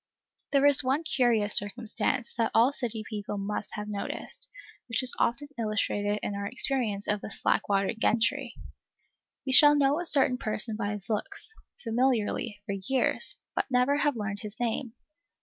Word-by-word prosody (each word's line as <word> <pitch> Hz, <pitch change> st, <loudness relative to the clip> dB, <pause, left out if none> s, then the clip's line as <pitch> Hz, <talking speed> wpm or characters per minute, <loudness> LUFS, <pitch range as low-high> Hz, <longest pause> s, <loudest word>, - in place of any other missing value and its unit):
There 280 Hz, 0 st, +3 dB
is 285 Hz, 0 st, +5 dB
one 270 Hz, +5 st, 0 dB
curious 235 Hz, -8 st, +2 dB
circumstance, 230 Hz, +4 st, -2 dB
that 230 Hz, -1 st, 0 dB
all 240 Hz, +5 st, +5 dB
city 230 Hz, -5 st, -3 dB
people 205 Hz, -2 st, -5 dB
must 210 Hz, +1 st, -4 dB
have 210 Hz, 0 st, -5 dB
noticed, 205 Hz, -1 st, -6 dB, 0.4 s
which 230 Hz, +3 st, 0 dB
is 250 Hz, -, +3 dB
often 285 Hz, +5 st, 0 dB
illustrated 210 Hz, -1 st, 0 dB
in -, -, -2 dB
our 200 Hz, 0 st, -3 dB
experience 235 Hz, -4 st, +1 dB
of 205 Hz, -1 st, 0 dB
the -, -, -7 dB
slack -, -, 0 dB
water 195 Hz, +2 st, +1 dB
gentry. 235 Hz, +4 st, 0 dB, 0.9 s
We 265 Hz, -, -1 dB
shall 295 Hz, +2 st, +8 dB
know 285 Hz, +2 st, +2 dB
a 350 Hz, -, +1 dB
certain 260 Hz, -4 st, +3 dB
person 215 Hz, +1 st, -1 dB
by 210 Hz, -1 st, -2 dB
his 205 Hz, -1 st, -7 dB
looks, 400 Hz, -, -4 dB, 0.3 s
familiarly, 230 Hz, -3 st, 0 dB
for -, -, -4 dB, 0.2 s
years, 265 Hz, -2 st, 0 dB, 0.2 s
but -, -, -1 dB
never 255 Hz, +3 st, +2 dB
have 290 Hz, -2 st, +1 dB
learned 210 Hz, -2 st, -4 dB
his 210 Hz, +1 st, -8 dB
name. 240 Hz, 0 st, -2 dB
230 Hz, 165 wpm, -28 LUFS, 210-265 Hz, 0.9 s, shall